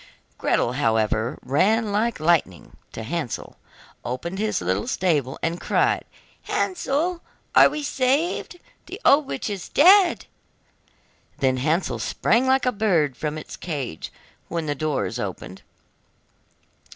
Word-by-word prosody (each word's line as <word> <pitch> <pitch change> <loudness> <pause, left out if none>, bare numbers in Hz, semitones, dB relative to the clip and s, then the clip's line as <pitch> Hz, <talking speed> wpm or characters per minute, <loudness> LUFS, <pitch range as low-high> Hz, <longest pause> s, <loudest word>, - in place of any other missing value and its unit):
Gretel, 120 - +1
however, 115 -3 0
ran 210 - +2
like 220 +1 0
lightning 155 - 0 0.2
to 115 - -7
Hansel, 150 -1 -4 0.5
opened 170 +10 -4
his 215 0 0
little 95 +3 -1
stable, 150 -8 0
and 165 +1 -2
cried: - - +1 0.4
'Hansel, 345 0 -1 0.3
we 300 - +6
are - - -7
saved! 285 +6 0 0.3
The 385 - -8
old 280 0 +5
witch - - -4
is 200 -4 -5
dead!' 365 +3 +5 1.1
Then 130 -1 +1
Hansel 155 +7 0
sprang 240 +4 +1
like 265 0 +3
a 250 - +3
bird 175 - +1
from 150 +2 -4
its 155 - -8
cage 140 - -5 0.4
when 165 -2 -3
the 145 - -1
door 150 0 -1
is - - -5
opened. - - -6
170 Hz, 125 wpm, -23 LUFS, -, 1.1 s, we